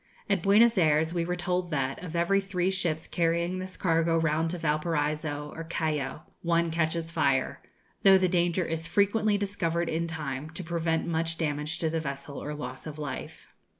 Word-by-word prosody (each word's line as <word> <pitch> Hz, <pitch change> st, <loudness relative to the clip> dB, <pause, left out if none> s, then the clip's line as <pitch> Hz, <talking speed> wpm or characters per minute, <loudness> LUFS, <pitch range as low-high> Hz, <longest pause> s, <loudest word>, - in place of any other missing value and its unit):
At 200 Hz, -4 st, +1 dB
Buenos 215 Hz, +3 st, +5 dB
Ayres 160 Hz, 0 st, +3 dB
we 170 Hz, -1 st, 0 dB
were 180 Hz, +1 st, -1 dB
told 180 Hz, 0 st, -1 dB
that, 135 Hz, -2 st, -2 dB
of 175 Hz, -2 st, -6 dB
every 175 Hz, +4 st, +3 dB
three 190 Hz, -1 st, 0 dB
ships 170 Hz, -4 st, -1 dB
carrying 170 Hz, +1 st, 0 dB
this 185 Hz, 0 st, -6 dB
cargo 165 Hz, -1 st, +2 dB
round 165 Hz, 0 st, +1 dB
to 180 Hz, -, -3 dB
Valparaiso 150 Hz, -2 st, -1 dB
or 165 Hz, -, -5 dB
Callao, 155 Hz, -3 st, -2 dB, 0.2 s
one 170 Hz, -1 st, +1 dB
catches 165 Hz, 0 st, -1 dB
fire, 140 Hz, -5 st, +1 dB, 0.4 s
though 195 Hz, -1 st, +8 dB
the 185 Hz, -1 st, +2 dB
danger 175 Hz, 0 st, +1 dB
is 165 Hz, 0 st, -3 dB
frequently 205 Hz, +3 st, +2 dB
discovered 170 Hz, -4 st, -1 dB
in 165 Hz, +1 st, -1 dB
time 150 Hz, -3 st, -4 dB
to 165 Hz, +3 st, -7 dB
prevent 165 Hz, -1 st, 0 dB
much 165 Hz, 0 st, -1 dB
damage 150 Hz, 0 st, -2 dB
to 160 Hz, -, 0 dB
the 165 Hz, -, 0 dB
vessel 140 Hz, -1 st, -5 dB
or 150 Hz, 0 st, -4 dB
loss 130 Hz, 0 st, -6 dB
of 155 Hz, -1 st, -7 dB
life. 150 Hz, -1 st, -6 dB
165 Hz, 180 wpm, -28 LUFS, 155-180 Hz, 0.4 s, though